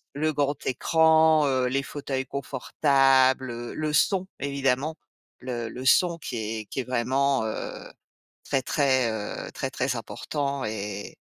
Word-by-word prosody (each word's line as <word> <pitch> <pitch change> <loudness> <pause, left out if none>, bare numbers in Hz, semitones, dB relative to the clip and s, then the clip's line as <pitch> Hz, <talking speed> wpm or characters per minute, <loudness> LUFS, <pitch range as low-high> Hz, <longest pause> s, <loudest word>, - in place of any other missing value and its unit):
le 155 +2 0
grand 145 0 +1
écran, 160 +3 +4
heu, 130 -2 +1
les 135 +2 0
fauteuils 135 -1 -4
confortables, 130 -2 +2
le 155 -1 -2
son 190 +4 +2
évidemment, 140 +2 0 0.4
le 120 -3 -4
le 125 +3 -7
son 170 +4 +4
qui 130 -6 -6
est 110 0 -4
qui 135 - -6
est - - 0
vraiment, 130 +1 +1
heu, 110 - -5 0.6
très, 135 - -1
très, 130 -4 +2
heu 105 -2 -5
très 135 - -3
très 130 -1 -1
important 140 +4 -3
et 105 -1 -5
135 Hz, 140 wpm, -26 LUFS, 125-145 Hz, 0.6 s, écran